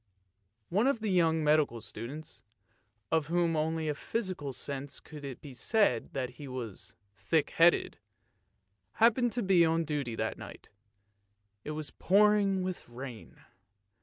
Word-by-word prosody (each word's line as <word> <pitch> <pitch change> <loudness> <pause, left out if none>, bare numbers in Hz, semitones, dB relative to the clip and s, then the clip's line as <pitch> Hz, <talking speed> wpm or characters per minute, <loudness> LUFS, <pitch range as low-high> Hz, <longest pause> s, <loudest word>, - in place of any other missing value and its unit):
One 210 +8 +2
of 275 -4 +2
the 215 -2 -1
young 165 -3 +3
medical 150 -6 +3
students, 120 +8 -8 0.7
of 160 -2 +2
whom 170 0 +1
only 160 +1 0
in 155 - +1
a - - -2
physical 185 -4 -3
sense 140 +1 -4
could 150 -2 -11
it 135 -3 -7
be 140 -3 -10
said 200 - +1
that 130 -2 -2
he 140 +3 -10
was 125 -6 -6 0.2
thick 155 - 0
headed, 170 +1 +3 0.9
happened 235 +1 +3
to 240 - 0
be 185 -3 +5
on 165 0 +2
duty 145 -6 -2
that - - -3
night; - - -11 0.9
it 150 - -5
was 155 -2 -5
pouring 200 -1 +3
with 185 -8 -5
rain. 120 -1 -9
155 Hz, 145 wpm, -31 LUFS, 140-185 Hz, 0.9 s, be